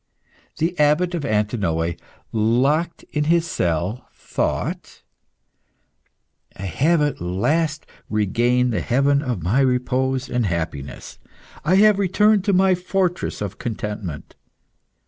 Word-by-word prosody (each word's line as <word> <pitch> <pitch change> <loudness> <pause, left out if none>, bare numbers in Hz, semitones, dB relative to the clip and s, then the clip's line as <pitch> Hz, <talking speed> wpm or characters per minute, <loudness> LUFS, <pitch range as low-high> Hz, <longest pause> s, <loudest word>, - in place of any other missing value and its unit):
The 165 +3 0
Abbot 150 +5 +3
of 170 -4 -2
Antinoe, 100 - 0 0.4
locked 130 +10 +1
in 150 0 0
his 170 +1 +3
cell, 90 - -2
thought - - -3 1.5
"I 95 - -8
have 150 - +2
at 145 -9 -2
last 150 - 0 0.2
regained 120 +4 +1
the - - 0
haven 140 +3 +2
of 125 - -3
my 100 +10 +2
repose 130 0 +1
and 125 -3 0
happiness. 80 -5 -5 0.4
I 170 +5 +3
have 210 0 +5
returned 205 +1 +3
to 205 - +3
my 190 0 +4
fortress 180 - -1
of 105 -1 -5
contentment. 105 -7 -5
130 Hz, 115 wpm, -22 LUFS, 105-165 Hz, 1.5 s, have